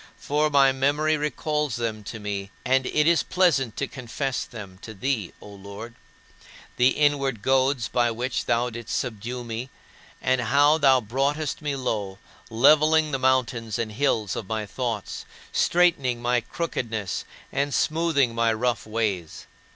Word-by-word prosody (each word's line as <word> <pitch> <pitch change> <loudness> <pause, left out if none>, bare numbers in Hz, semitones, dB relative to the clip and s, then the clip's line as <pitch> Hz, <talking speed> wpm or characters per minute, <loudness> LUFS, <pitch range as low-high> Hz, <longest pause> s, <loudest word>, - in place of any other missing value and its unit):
For 150 +1 0
my 140 -2 +5
memory 145 +4 +1
recalls 150 -2 -1
them 115 -3 -3
to 115 - -6
me 100 -1 -4 0.2
and 130 +1 +2
it 150 - +2
is 170 0 +4
pleasant 140 - +1
to 140 - 0
confess 135 +1 -3
them 100 -6 -10
to 110 - -9
thee, 110 -3 -2
O - - -13
Lord: 100 +3 -9 0.8
the 125 - +5
inward 140 -5 +1
goads 130 -1 +2
by 120 -1 +1
which 120 +2 -2
thou 120 +1 +1
didst 120 0 -4
subdue 120 +1 -4
me 115 +2 -5 0.5
and 130 -1 +1
how 145 +6 +4
thou 135 -3 +5
broughtest 140 +8 -1
me 145 -2 -2
low, 105 -7 -3 0.3
leveling 155 +6 +4
the 135 - -1
mountains 125 -4 +1
and 115 -2 -2
hills 110 -4 0
of 105 - -5
my 110 -1 -2
thoughts, 120 +3 -4 0.3
straightening 165 -9 +2
my 120 0 +1
crookedness, 115 - -3 0.3
and 140 +1 -1
smoothing 155 -6 +1
my 115 0 +2
rough 120 +1 -1
ways. 105 -7 -2
125 Hz, 150 wpm, -25 LUFS, 115-140 Hz, 0.8 s, my